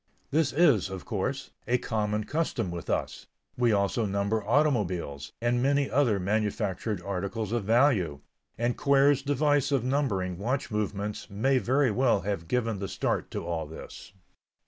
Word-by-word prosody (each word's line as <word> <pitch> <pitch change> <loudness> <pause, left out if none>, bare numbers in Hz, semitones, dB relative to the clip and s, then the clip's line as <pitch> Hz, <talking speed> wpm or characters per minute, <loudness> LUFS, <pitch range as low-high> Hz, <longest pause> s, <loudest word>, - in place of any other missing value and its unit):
This 155 -1 +2
is, 135 - +4
of 95 -1 -7
course, 125 +6 -3 0.2
a 125 - +3
common 105 -2 -1
custom 150 - -2
with 85 0 -6
us; - - -2 0.3
we 120 -2 +2
also 100 +2 +1
number 100 +2 0
automobiles, 90 - 0
and 120 +1 +1
many 140 +1 +2
other 125 -8 +3
manufactured 105 0 -1
articles 100 +3 -3
of 120 -4 -1
value, 110 - +3 0.4
and 120 +1 0
Quare's 140 0 +4
device 145 0 +1
of 135 -4 +2
numbering 105 -10 -1
watch 130 +5 -2
movements 105 0 -3
may 130 +7 +2
very 130 +3 +2
well 120 -3 +2
have 95 -4 -3
given 115 -3 0
the 100 - -3
start 95 +1 -2
to - - -5
all 80 -3 -3
this. 80 - -10
110 Hz, 150 wpm, -28 LUFS, 100-135 Hz, 0.4 s, is